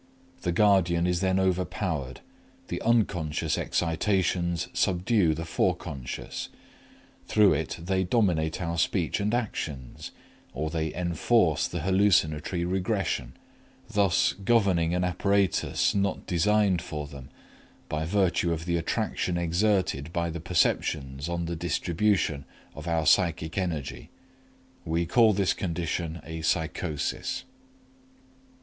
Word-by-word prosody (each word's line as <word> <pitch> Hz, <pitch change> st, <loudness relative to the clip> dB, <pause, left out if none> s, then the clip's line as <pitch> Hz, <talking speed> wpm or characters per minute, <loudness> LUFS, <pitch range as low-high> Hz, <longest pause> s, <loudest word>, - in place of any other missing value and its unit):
The 90 Hz, -, -1 dB
guardian 90 Hz, -3 st, +3 dB
is 90 Hz, -1 st, +1 dB
then 95 Hz, -1 st, +2 dB
overpowered, 90 Hz, -, -1 dB, 0.5 s
the -, -, -3 dB
unconscious 100 Hz, -10 st, +1 dB
excitations 85 Hz, 0 st, 0 dB
subdue 90 Hz, -2 st, +2 dB
the 85 Hz, +2 st, -5 dB
Forec.; 70 Hz, -5 st, -3 dB, 0.8 s
through 105 Hz, -2 st, +5 dB
it -, -, -2 dB
they 95 Hz, +3 st, 0 dB
dominate 90 Hz, -6 st, +1 dB
our 85 Hz, 0 st, -2 dB
speech -, -, 0 dB
and 105 Hz, +1 st, 0 dB
actions, 80 Hz, -, -4 dB, 0.5 s
or 75 Hz, +3 st, -2 dB
they 80 Hz, -1 st, -1 dB
enforce 85 Hz, -, +2 dB
the 85 Hz, -, -4 dB
hallucinatory 90 Hz, -3 st, +2 dB
regression, 90 Hz, -, -1 dB, 0.5 s
thus 100 Hz, -4 st, +2 dB
governing 95 Hz, -6 st, +3 dB
an 90 Hz, -, 0 dB
apparatus 100 Hz, +2 st, +1 dB
not 100 Hz, -1 st, -1 dB
designed 95 Hz, 0 st, +2 dB
for 75 Hz, -3 st, -5 dB
them 70 Hz, -2 st, -11 dB, 0.6 s
by 75 Hz, +1 st, -2 dB
virtue 90 Hz, -1 st, +1 dB
of 80 Hz, 0 st, -3 dB
the 85 Hz, -1 st, 0 dB
attraction 85 Hz, +1 st, -1 dB
exerted 85 Hz, -3 st, 0 dB
by 85 Hz, -1 st, -1 dB
the 85 Hz, 0 st, -6 dB
perceptions 75 Hz, -4 st, 0 dB
on 85 Hz, 0 st, -2 dB
the 85 Hz, +1 st, -3 dB
distribution 85 Hz, -1 st, 0 dB, 0.3 s
of 75 Hz, +3 st, -9 dB
our 80 Hz, -2 st, 0 dB
psychic 85 Hz, -2 st, +2 dB
energy. 85 Hz, -8 st, -3 dB, 0.7 s
We 85 Hz, +1 st, 0 dB
call 110 Hz, +4 st, +4 dB
this 100 Hz, -1 st, +2 dB
condition 85 Hz, -1 st, -3 dB
a 80 Hz, 0 st, -6 dB
psychosis. 80 Hz, -2 st, -2 dB
85 Hz, 115 wpm, -27 LUFS, 80-95 Hz, 0.8 s, through